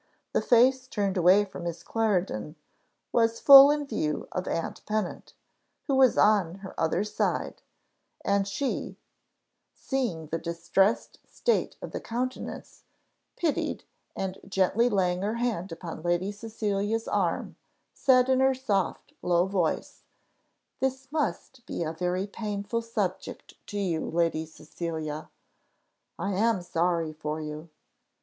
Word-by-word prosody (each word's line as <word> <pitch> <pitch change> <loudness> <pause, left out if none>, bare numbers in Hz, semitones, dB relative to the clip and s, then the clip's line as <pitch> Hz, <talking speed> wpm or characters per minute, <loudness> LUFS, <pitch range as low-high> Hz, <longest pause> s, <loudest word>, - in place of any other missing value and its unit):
The - - +2
face 255 +2 +4
turned 200 -5 -1
away 185 +3 +5
from 195 - -9
Miss 170 0 -5
Clarendon 185 - -1 0.6
was 230 -1 +2
full 275 0 +10
in 295 0 +1
view 155 - -2
of 185 0 -3
aunt 165 - -3
Pennant, 210 -4 -3 0.5
who 280 - -1
was 265 -2 +5
on 200 -5 +4
her 190 - -8
other 165 +4 +1
side; 210 - -2 0.6
and 200 0 +2
she, 255 +7 -3 0.8
seeing 240 - -2
the 165 +2 -3
distressed 170 +6 0
state 475 - 0
of - - -6
the - - -5
countenance, 255 +3 -5 0.5
pitied, 325 -4 -1 0.3
and 190 0 -4
gently 195 +5 +2
laying 180 -4 +1
her 210 +3 -1
hand 225 -7 -2
upon 165 -1 -7
Lady 175 +3 0
Cecilia's 215 0 -2
arm, - - -1 0.4
said, 255 -2 +4
in 260 0 +3
her 265 0 +4
soft 205 -8 -2
low 175 0 +3
voice, 190 -4 -1 0.8
"This 265 0 -2
must 280 -4 -3
be - - -3
a 160 0 -3
very 180 +3 -1
painful 205 +1 -3
subject 215 -5 -4
to 205 - -5
you, 175 -6 -1
Lady 165 -1 0
Cecilia. 155 -1 -6 0.9
I 195 +4 -2
am 205 -1 +1
sorry 170 -2 0
for 155 0 -4
you." 155 +1 -7
200 Hz, 130 wpm, -28 LUFS, 170-230 Hz, 0.9 s, full